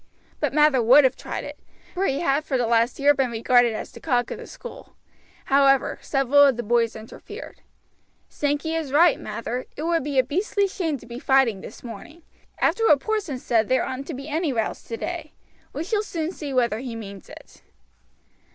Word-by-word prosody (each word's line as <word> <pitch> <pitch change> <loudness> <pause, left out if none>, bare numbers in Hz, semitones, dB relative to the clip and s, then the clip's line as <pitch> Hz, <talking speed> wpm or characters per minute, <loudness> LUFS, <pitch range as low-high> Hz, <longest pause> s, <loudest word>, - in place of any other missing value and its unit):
But - - 0
Mather 300 -3 +4
would 255 +6 +7
have 260 0 +3
tried - - -6
it, - - -9 0.3
for 380 +2 0
he 275 - -1
had 285 -2 +1
for 270 -3 -1
the 245 - +1
last 230 +1 +2
year 285 +1 +5
been 270 -3 0
regarded 235 +1 +3
as - - -6
the - - -12
cock 245 -5 0
of - - -5
the - - -9
school. - - -11 0.5
However, 275 -1 +3
several 275 +1 +3
of 270 -4 +3
the 240 - -3
boys 230 +1 +1
interfered. 220 0 -10 0.7
"Sankey 290 +2 -2
is 320 -4 -3
right, 330 +3 +5
Mather; 245 +2 -5
it 300 - -4
would 335 -2 +1
be 285 -1 -3
a 260 - +6
beastly 390 +8 0
shame 330 -6 -2
to 235 - -15
be 240 +1 -8
fighting 265 -8 +2
this - - -11
morning. 245 +9 -10 0.4
After 450 +7 +2
what 295 - +6
Porson 410 -7 -2
said 225 -3 0
there 260 -1 +2
oughtn't 260 +2 -5
to 320 - -5
be 275 +3 -8
any 315 0 -1
rows 225 -4 -2
today. 310 +7 -6 0.4
We 300 - -4
shall 415 +4 0
soon 335 -5 -4
see 295 -6 -7
whether 240 -4 +1
he 245 -2 -6
means 200 -3 -9
it." - - -14
275 Hz, 195 wpm, -24 LUFS, 240-315 Hz, 0.7 s, would